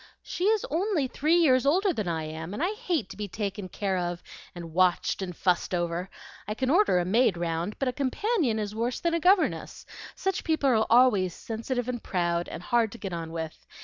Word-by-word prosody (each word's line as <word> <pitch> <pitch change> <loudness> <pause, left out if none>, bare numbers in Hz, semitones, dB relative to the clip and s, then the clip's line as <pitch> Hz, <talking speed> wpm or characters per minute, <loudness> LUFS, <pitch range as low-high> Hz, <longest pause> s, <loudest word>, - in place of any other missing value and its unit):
"She 360 - -3
is 430 0 +2
only 345 -2 +1
three 305 +6 +1
years 265 -7 +4
older 365 +7 +3
than 215 - -3
I 165 -2 -1
am, 160 +4 -6
and 295 - -2
I 380 +4 +1
hate 360 - -2
to - - -10
be 210 -1 -4
taken 200 -1 -4
care 190 -2 -1
of, 175 0 -3 0.3
and 170 -2 -8
watched, 185 +2 +2
and 180 -3 -5
fussed 180 0 +1
over. 175 +1 -2 0.4
I 210 - -3
can 260 +2 0
order 360 - +4
a 175 - +1
maid 205 0 +3
round, 170 +3 -2
but 275 - -1
a 250 - 0
companion 285 - 0
is 210 -1 -3
worse 235 +3 -2
than 340 -1 0
a 335 - +2
governess; 370 +3 +1 0.3
such 385 -1 -2
people 315 -4 +1
are 220 -2 +3
always 220 -7 +4
sensitive 235 +2 -4
and 245 -2 -3
proud, 175 -2 -1
and - - -7
hard 230 -1 +2
to - - -9
get 195 -5 -6
on 165 -1 -5
with. 160 -1 -6
220 Hz, 215 wpm, -27 LUFS, 180-290 Hz, 0.4 s, years